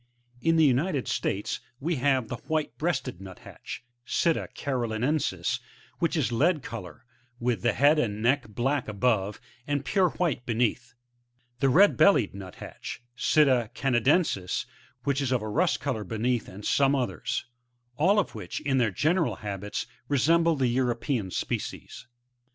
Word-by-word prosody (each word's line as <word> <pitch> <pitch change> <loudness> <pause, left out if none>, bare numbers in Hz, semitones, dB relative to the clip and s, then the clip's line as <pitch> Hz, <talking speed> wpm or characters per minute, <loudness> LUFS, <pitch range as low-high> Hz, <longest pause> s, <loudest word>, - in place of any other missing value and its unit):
3. 165 - +1
[In 165 - +5
the 160 -1 +5
United 140 +1 +1
States 100 - -1 0.2
we 160 +3 -1
have 130 -2 +2
the 120 - -4
White 155 -1 -1
breasted 155 - -1
Nuthatch^ 95 -2 -9 0.2
— 120 - -50
SUta 165 +6 +1
caroiinensiSf 130 +2 -1 0.2
— - - -28
which 170 0 +1
is 140 -5 +1
lead 150 +5 +2
colour, 90 -6 -8 0.3
with 120 -1 0
the 120 - +2
head 145 +3 +4
and 105 -6 -1
neck 125 +5 +2
black 125 +6 -1
above, 105 -1 0 0.3
and 145 -2 -1
pure 190 +1 +3
white 165 -9 -1
beneath; 120 +1 -1 0.6
the 135 - +3
Red 195 +10 +5
bellied 160 - +5
Nuthatch, 100 +4 -8
— 120 - -48
Sitta 130 -6 +3
canadensis, 125 - +1 0.2
— - - -32
which 140 0 0
is 135 -2 -1
of 125 -4 +1
a - - -4
rust 165 - +1
colour 125 -7 -2
be 110 +3 -5
neath, 120 +1 0
and 100 +3 -10
some 140 0 +3
others; 130 -3 -2 0.5
all 185 +10 +3
of 205 - +1
which, - - -5
in 140 -3 +1
their 120 -3 +3
general 155 - +1
habits, 100 0 -3 0.2
resemble 165 +4 +3
the 135 -3 +1
European 120 -3 0
species. - - -4
130 Hz, 160 wpm, -27 LUFS, 115-150 Hz, 0.6 s, In